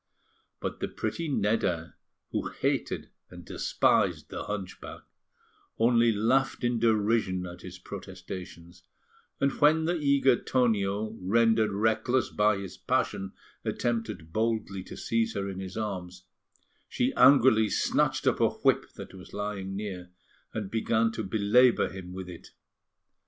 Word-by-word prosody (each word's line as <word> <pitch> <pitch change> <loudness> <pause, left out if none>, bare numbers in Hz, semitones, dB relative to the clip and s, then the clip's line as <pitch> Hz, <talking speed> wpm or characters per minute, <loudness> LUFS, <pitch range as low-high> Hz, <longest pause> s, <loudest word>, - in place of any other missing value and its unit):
But - - -4
the - - -2
pretty 170 -1 -3
Nedda, 105 - 0 0.4
who - - -2
hated - - -2 0.2
and - - -12
despised - - +1
the - - -5
hunchback, 100 -3 -6 0.8
only 115 0 +4
laughed 125 +6 +1
in 120 -1 +1
derision 110 -4 +1
at 90 0 -9
his 95 0 -9
protestations; 90 -2 -9 0.6
and 140 0 +2
when 160 +2 +5
the 175 +1 +1
eager 140 -4 +3
Tonio, 110 -3 0
rendered 110 +3 +3
reckless 110 +4 +1
by 105 -1 +2
his 100 -2 -7
passion, 95 0 -1 0.3
attempted 115 -9 -3
boldly 110 -3 -1
to - - -9
seize 115 -1 -1
her 100 0 -2
in 95 -1 -5
his 95 +1 -7
arms, 90 -4 -5 0.7
she 125 +2 0
angrily 125 -5 +6
snatched - - +1
up - - +2
a - - +4
whip - - +1
that - - -9
was 95 -1 -12
lying 100 -2 -4
near, 95 -3 -5 0.4
and 105 -3 -5
began 115 0 +1
to 110 - -4
belabour 110 +5 +3
him 95 -2 -9
with 95 0 -7
it. 90 -2 -10
105 Hz, 135 wpm, -28 LUFS, 95-115 Hz, 0.8 s, angrily